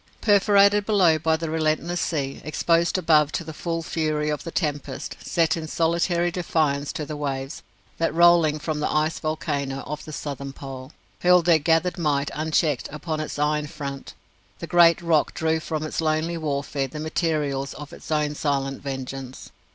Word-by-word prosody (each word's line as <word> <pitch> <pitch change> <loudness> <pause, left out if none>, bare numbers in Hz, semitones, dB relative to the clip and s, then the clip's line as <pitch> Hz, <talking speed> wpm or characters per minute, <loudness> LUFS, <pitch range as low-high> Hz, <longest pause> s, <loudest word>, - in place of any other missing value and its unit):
Perforated 205 0 +4
below 180 -7 +4
by 160 +1 +2
the 165 0 -4
relentless 160 +2 0
sea, 140 -4 -2
exposed 170 +3 +1
above 155 -5 +3
to 170 - -2
the 160 0 -8
full 165 +2 -3
fury 155 -2 -1
of 150 - -3
the - - -5
tempest; 150 -4 -3
set 165 +1 +1
in 160 -1 -5
solitary 170 +2 +1
defiance 155 -5 0
to 150 - -4
the 150 - -6
waves, 135 -1 -4 0.4
that 165 - +1
rolling 170 -2 +5
from 155 0 -3
the 150 - -1
ice 155 +1 0
volcano 140 -3 -2
of 150 +1 -6
the 155 - -9
Southern 140 -2 -5
Pole, 135 -1 -9 0.3
hurled 180 -1 +5
their 170 -2 +5
gathered 165 +4 +1
might 145 -3 0
unchecked 155 -3 0
upon 155 +1 -4
its 155 - -4
iron 150 0 0
front, 140 -2 -7 0.4
the - - -6
great 170 -1 +5
rock 165 -3 +2
drew 160 0 +1
from 155 -1 -4
its 155 - -3
lonely 160 +2 0
warfare 140 -3 -2
the 150 +4 -8
materials 150 -4 -1
of 150 -1 -9
its - - -11
own 150 -1 +1
silent 135 -2 -2
vengeance. 135 -1 -6
155 Hz, 170 wpm, -24 LUFS, 145-165 Hz, 0.4 s, rolling